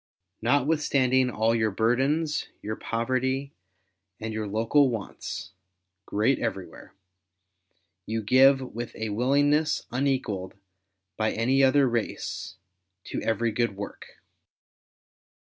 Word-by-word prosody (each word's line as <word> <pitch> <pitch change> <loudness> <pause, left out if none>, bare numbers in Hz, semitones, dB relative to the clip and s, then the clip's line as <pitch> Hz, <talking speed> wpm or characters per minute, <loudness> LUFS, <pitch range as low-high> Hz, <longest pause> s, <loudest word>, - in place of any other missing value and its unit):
Notwithstanding 130 -1 +2
all 110 -1 +1
your 110 -1 +2
burdens, 135 +9 +1 0.2
your 110 +1 -3
poverty, 130 +5 -1 0.7
and 110 0 -4
your 110 -1 -3
local 115 +7 +3
wants 110 -4 -6 0.3
— 95 +1 -55
great 110 +6 +1
everywhere 100 -5 -5 0.6
— 90 -1 -48
you 110 0 -2
give 135 +5 +5
with 120 +1 -6
a 110 0 -3
willingness 145 +7 +2
unequalled 125 -9 -1 0.6
by 110 0 +1
any 130 +5 +2
other 135 +1 +5
race, 115 -5 -3 0.5
to - - -5
every 115 +1 0
good 115 -2 0
work. 100 - -9
115 Hz, 110 wpm, -26 LUFS, 110-135 Hz, 0.7 s, give